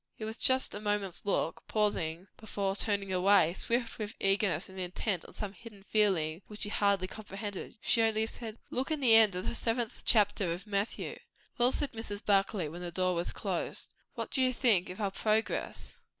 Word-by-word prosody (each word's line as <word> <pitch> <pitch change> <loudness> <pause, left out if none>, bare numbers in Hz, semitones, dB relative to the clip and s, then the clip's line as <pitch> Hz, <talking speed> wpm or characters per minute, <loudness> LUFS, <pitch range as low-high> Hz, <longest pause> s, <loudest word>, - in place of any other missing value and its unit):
It 215 - -5
was 220 +2 -5
just 260 0 +3
a 205 - -6
moment's 205 -2 -2
look, 180 -4 0
pausing 185 -5 -1
before 200 -3 -2
turning 200 -2 0
away; 185 -2 +4
swift 230 +4 +1
with 215 0 -5
eagerness 195 -3 +1
and 190 0 -10
intent 180 +1 -2
with - - -14
some 205 -2 -4
hidden 205 0 -13
feeling 190 -6 +1
which 210 0 -2
he 205 - 0
hardly 200 -3 +2
comprehended. 205 0 -7
She 230 - +3
only 220 -1 +2
said, 225 -1 -7
"Look 260 +4 -2
in 310 -1 -1
the 250 -5 +5
end 215 -4 +6
of 180 +3 -4
the - - -1
seventh 235 0 -2
chapter 205 -5 +3
of 180 +5 -8
Matthew." 205 +1 -3 0.4
"Well," 245 +1 +5
said 290 0 +1
Mrs. 215 -3 -6
Barclay, 195 -3 +2
when 170 +4 -8
the 175 - -4
door 185 +1 +1
was 170 0 -2
closed, - - -4 0.2
"what - - -4
do 265 - +1
you 255 0 +3
think 215 -9 +3
of 180 - -8
our 200 -2 -1
progress?" 215 +2 -2
205 Hz, 195 wpm, -31 LUFS, 190-225 Hz, 0.4 s, end